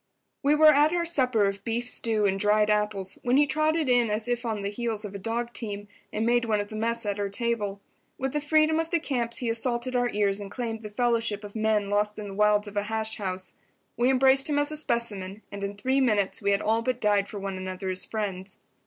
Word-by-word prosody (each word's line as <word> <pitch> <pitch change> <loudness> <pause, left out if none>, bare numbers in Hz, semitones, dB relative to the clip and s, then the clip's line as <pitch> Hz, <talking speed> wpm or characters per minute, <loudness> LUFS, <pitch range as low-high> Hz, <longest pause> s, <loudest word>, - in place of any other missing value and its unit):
We 290 +1 +3
were 305 0 +7
at 295 +2 +4
our 345 -1 0
supper 255 -10 +2
of 200 0 -3
beef 235 +2 -2
stew 220 -3 0
and 195 -1 +1
dried 210 +1 +3
apples 210 -2 -1
when 250 +2 +2
he 295 - +5
trotted 310 +1 +1
in 245 -2 +3
as 215 +2 0
if 245 0 -2
on 215 -3 -3
the 200 - -2
heels 225 -1 -3
of 205 - -7
a 200 - -6
dog 235 +4 -3
team, 205 -3 -5 0.2
and 215 +1 -1
made 240 +1 +3
one 215 -2 +1
of 205 0 -4
the 215 - -8
mess 230 +1 0
at 205 0 -2
our 200 -1 -1
table. 205 -2 -2 0.4
With 265 0 -3
the 295 - -1
freedom 310 +1 +3
of 325 0 -2
the 340 - +1
camps 245 -6 -1
he 240 - -2
assaulted 240 +2 -1
our 245 0 +2
ears 205 -1 0
and 200 - -7
claimed 225 0 -4
the 210 - -7
fellowship 230 -2 0
of 205 +1 -10
men 215 -2 0
lost 210 +1 +1
in 210 -1 -6
the - - -7
wilds 210 +1 +2
of 205 0 -8
a 205 - +1
hash 220 0 -1
house. 185 -2 -4 0.4
We 240 +2 +2
embraced 265 +2 +5
him 290 - +1
as 290 +1 +2
a - - -3
specimen, 215 -7 -1
and 200 0 -6
in 200 0 -4
three 260 +6 +1
minutes 210 -6 +1
we 200 - 0
had 200 0 +1
all 225 +2 +2
but 250 +1 -2
died 205 -2 +2
for 210 - -7
one 195 -1 -4
another 185 0 -5
as 185 0 0
friends. 195 -3 -4
220 Hz, 245 wpm, -26 LUFS, 205-245 Hz, 0.4 s, were